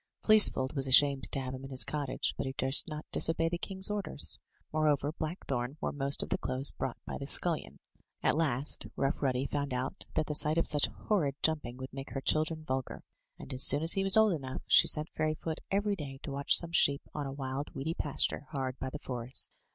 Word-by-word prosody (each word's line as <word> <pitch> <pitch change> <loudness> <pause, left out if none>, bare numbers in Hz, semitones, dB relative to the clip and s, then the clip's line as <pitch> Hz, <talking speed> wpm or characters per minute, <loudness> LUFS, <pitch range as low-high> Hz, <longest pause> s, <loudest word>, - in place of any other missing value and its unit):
Fleecefold 210 -12 +4
was 135 -1 0
ashamed 140 0 +4
to - - -1
have 130 -1 -5
him 130 0 -8
in 135 - -8
his 130 -1 +3
cottage, 145 -3 -2
but - - -4
he 130 - -4
durst 135 +2 +5
not 150 -1 -7
disobey 165 0 +1
the 170 0 -4
king's 190 +2 -1
orders. 200 -8 -1 0.3
Moreover, 150 -2 +1
Blackthorn 150 -5 -5
wore - - -3
most 140 0 0
of - - -8
the - - -1
clothes 130 +2 +1
brought 130 -2 -5
by - - -6
the 140 - -6
scullion. 165 +1 +1 0.5
At - - +2
last. 145 -3 +1
Rough 135 +1 -2
Ruddy 130 -1 0
found 140 -2 -3
out 130 +1 -5
that 155 - +1
the 150 - -4
sight 150 +1 +3
of 165 - +2
such 145 -1 +3
horrid 155 -11 -2
jumping 150 -6 -1
would 130 0 -9
make 135 0 -8
her 135 - -3
children 155 +3 0
vulgar; 130 -3 -5 0.3
and, 135 - -8
as 130 - -1
soon 145 +3 +6
as 165 - +4
he 195 - -1
was 195 +2 +3
old 220 -3 +4
enough, 130 -5 -6
she - - +5
sent 150 +1 +2
Fairyfoot 155 +1 -3
every 200 +1 0
day 140 -6 -8
to - - -6
watch 140 +1 +4
some 170 -1 0
sheep 140 -4 +2
on 145 -2 -4
a - - -6
wild, 135 +1 -6
weedy 150 +5 -3
pasture, 145 -2 -2
hard 135 -3 -4
by 130 - -4
the 150 - -7
forest. 125 -2 -2
145 Hz, 220 wpm, -30 LUFS, 135-160 Hz, 0.5 s, soon